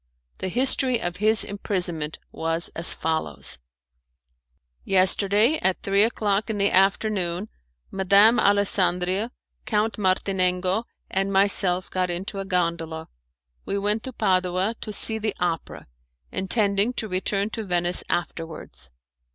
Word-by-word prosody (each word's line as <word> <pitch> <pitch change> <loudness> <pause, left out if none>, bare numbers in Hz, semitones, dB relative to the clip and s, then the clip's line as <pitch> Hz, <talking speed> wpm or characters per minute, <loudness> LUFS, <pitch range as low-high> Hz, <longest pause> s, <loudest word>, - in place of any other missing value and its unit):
The - - -3
history 255 +3 +2
of 175 -4 -4
his 215 +2 +4
imprisonment 175 -6 -2
was 165 +1 +2
as 165 - +2
follows: 160 - -3 1.2
"Yesterday, 200 +7 +3
at 190 -1 0
three 195 0 +2
o'clock 210 -2 +1
in 220 - -2
the 200 0 +2
afternoon, 195 0 +1 0.4
Madame 200 +5 +4
Alessandria, 195 +1 +1 0.3
Count 215 0 -1
Martinengo, 185 +1 0 0.3
and 195 +1 -1
myself, 190 -2 +3
got 185 -1 -1
into 190 +3 -4
a 195 - -4
gondola. 170 -3 -2 0.5
We 200 - -3
went 210 +2 0
to 260 - -7
Padua 185 -2 0
to 215 - -6
see 220 +2 -1
the 215 -1 -2
opera, 170 -2 -3 0.5
intending 200 +3 0
to 225 - -3
return 195 +2 -1
to 225 - -4
Venice 175 -2 -1
afterwards. 160 - -5
195 Hz, 120 wpm, -24 LUFS, 180-210 Hz, 1.2 s, his